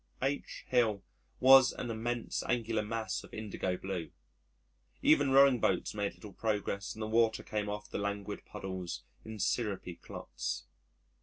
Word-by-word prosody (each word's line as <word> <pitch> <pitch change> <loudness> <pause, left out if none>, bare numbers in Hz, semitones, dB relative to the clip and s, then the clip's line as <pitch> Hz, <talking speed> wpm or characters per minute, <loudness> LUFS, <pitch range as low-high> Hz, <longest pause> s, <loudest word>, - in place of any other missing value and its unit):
H 140 +1 -2
Hill 110 -6 +2 0.4
was 130 0 +8
an 120 - -4
immense 115 +1 -2
angular 115 -2 +1
mass 110 +1 -3
of - - -14
indigo 100 -4 -2
blue. 95 -4 -4 0.9
Even 145 -2 +5
rowing 135 -2 +7
boats 95 -4 +1
made 100 -1 -2
little 105 -3 -11
progress 105 -3 -2
and 110 - -5
the - - -2
water 110 0 +3
came 105 -1 -2
off 105 0 -4
the - - -4
languid 100 -1 -3
paddles 90 -9 -5 0.2
in 110 0 -7
syrupy 100 -4 -1
clots. 60 -4 -5
110 Hz, 145 wpm, -32 LUFS, 100-115 Hz, 0.9 s, was